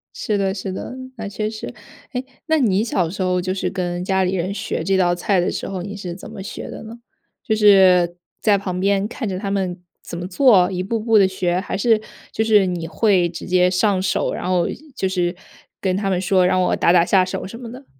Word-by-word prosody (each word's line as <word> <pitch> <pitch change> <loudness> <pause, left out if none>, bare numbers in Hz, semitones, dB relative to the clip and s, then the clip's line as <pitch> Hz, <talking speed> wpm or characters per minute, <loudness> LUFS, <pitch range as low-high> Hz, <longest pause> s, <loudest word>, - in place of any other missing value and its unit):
是 215 -4 -1
的 195 -1 0
是 195 -1 -5
的， 190 - -6 0.2
那 220 -2 -5
确 210 +2 -3
实。 215 0 -7 0.4
诶， 250 0 -3 0.2
那 320 -1 +3
你 210 -6 +2
小 185 -7 0
时 190 +3 -6
候 180 -1 +1
就 185 +1 -2
是 190 - -2
跟 175 -1 -3
家 190 0 +1
里 185 +1 0
人 185 +2 -2
学 - - -3
这 195 0 +1
道 175 -2 +3
菜 185 +2 +1
的 175 - 0
时 - - -4
候， 190 -2 -4
你 200 +2 -6
是 180 -4 -6
怎 185 - -10
么 - - -8
学 195 - -7
的 - - -8
呢？ 225 +1 -9 0.5
就 220 - 0
是 190 -5 +5 0.3
在 210 -2 +4
旁 185 -2 -4
边 200 +1 +1
看 230 +1 -5
着 190 -2 -3
他 195 0 -3
们 185 -3 -2 0.2
怎 170 - -7
么 175 +1 -5
做， 195 -3 +4
一 180 -1 -2
步 220 +5 -2
步 225 0 +3
地 195 -2 +6
学？ 180 -1 -1
还 190 - -4
是 220 +1 +3 0.3
就 220 - 0
是 215 -3 +4
你 175 -3 -3
会 185 -1 +2
直 170 - -8
接 180 0 +3
上 190 +1 +1
手， 190 - 0
然 - - -4
后 180 -2 +2 0.3
就 190 - -1
是 180 -1 -1 0.4
跟 185 -2 0
他 195 0 -1
们 185 -2 +1
说， 185 0 +2
让 185 0 +2
我 180 - +2
打 - - +3
打 170 -1 +5
下 190 0 +4
手 185 - -4
什 230 +4 -9
么 235 -2 -8
的？ 260 +3 -11
190 Hz, 255 characters per minute, -20 LUFS, 180-210 Hz, 0.5 s, 地